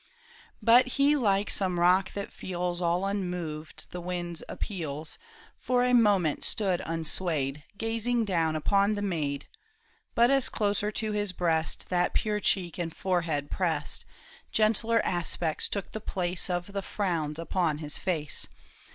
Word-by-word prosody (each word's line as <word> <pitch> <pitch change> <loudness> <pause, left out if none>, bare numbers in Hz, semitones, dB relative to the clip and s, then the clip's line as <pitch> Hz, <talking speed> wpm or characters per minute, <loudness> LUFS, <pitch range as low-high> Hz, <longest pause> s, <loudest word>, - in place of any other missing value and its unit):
But 245 +3 +7
he 285 +2 +5
like 205 -6 +2
some 185 -3 +1
rock 180 +2 +4
that 200 0 -5
feels 180 -1 -3
All 175 +2 +1
unmoved 180 -6 -4
the 180 - -5
wind's 175 -1 -4
appeals. 155 -6 -4 0.4
For 250 -1 +2
a 250 0 +2
moment 200 -10 +3
stood 190 -5 +1
unswayed, 160 -3 0
Gazing 230 +1 0
down 165 -5 +1
upon 200 +6 +2
the 205 - -3
maid. 150 -7 -2 0.7
But 235 +2 +5
as 275 -2 +4
closer 205 -1 0
to 215 +1 -1
his 205 -2 0
breast 165 -3 0
That 180 -1 +1
pure 210 -2 +1
cheek 185 -3 0
and 170 -1 -2
forehead 165 -6 -1
pressed. 160 -5 0 0.5
Gentler 225 +1 +2
aspects 170 -2 -1
took 200 -3 -4
the 215 - -5
place 180 -3 -1
Of 180 +2 -2
the 200 - -1
frowns 170 -7 -2
upon 165 -2 0
his 150 -1 -3
face. 160 -6 -1
180 Hz, 145 wpm, -28 LUFS, 165-205 Hz, 0.7 s, But